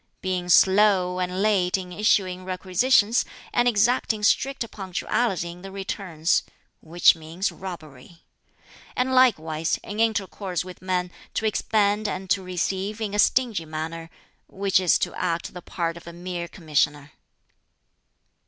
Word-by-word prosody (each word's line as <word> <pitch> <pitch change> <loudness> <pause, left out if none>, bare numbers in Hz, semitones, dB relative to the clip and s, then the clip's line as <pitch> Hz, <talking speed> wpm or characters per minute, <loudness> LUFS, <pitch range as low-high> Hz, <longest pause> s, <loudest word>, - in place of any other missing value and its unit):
Being 180 -1 -2
slow 190 0 +4
and 180 +2 -1
late 195 -4 +2
in 180 -1 -7
issuing 185 -2 +1
requisitions, 200 +5 +2 0.3
and 240 0 +3
exacting 220 -1 +2
strict 265 +2 +1
punctuality 190 -1 -2
in 175 +1 -12
the 195 +1 -9
returns 190 -4 -1 0.4
which 170 +2 +4
means 165 +5 -3
robbery. 165 -4 -10 0.7
And 255 +1 0
likewise, 165 -11 +2
in 210 +1 -6
intercourse 200 -5 -1
with 185 -1 -11
men, 180 -1 -1 0.2
to 220 - -1
expend 210 0 +1
and 190 -1 -5
to 195 - +3
receive 190 +3 -3
in 210 -2 -3
a 205 - -1
stingy 225 -8 +2
manner 160 +1 -6 0.4
which 195 -1 +1
is 180 -2 +3
to - - -2
act 170 -2 -2
the 180 - -8
part 170 -1 -3
of 170 - -13
a 170 - -8
mere 175 0 -5
commissioner." 150 -4 -1
185 Hz, 135 wpm, -24 LUFS, 170-210 Hz, 0.7 s, slow